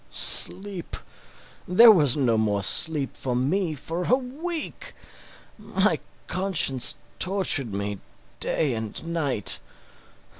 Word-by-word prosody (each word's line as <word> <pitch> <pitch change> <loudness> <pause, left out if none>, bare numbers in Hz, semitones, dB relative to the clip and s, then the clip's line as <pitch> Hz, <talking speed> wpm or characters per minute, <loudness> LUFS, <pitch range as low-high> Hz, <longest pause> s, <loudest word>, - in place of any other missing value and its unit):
Sleep! 195 -3 0 0.7
There 225 +6 +8
was 150 - +4
no 125 -5 +1
more 105 -2 0
sleep 150 - +2
for 125 -2 -3
me 160 +6 -1
for 165 +5 -5
a 250 - +4
week. 315 - -6 0.6
My - - 0 0.3
conscience 180 -9 +1 0.2
tortured 185 - 0
me 100 0 -4 0.4
day 145 -5 0
and 110 -2 -5
night. 155 - +1
160 Hz, 105 wpm, -24 LUFS, 125-195 Hz, 0.7 s, There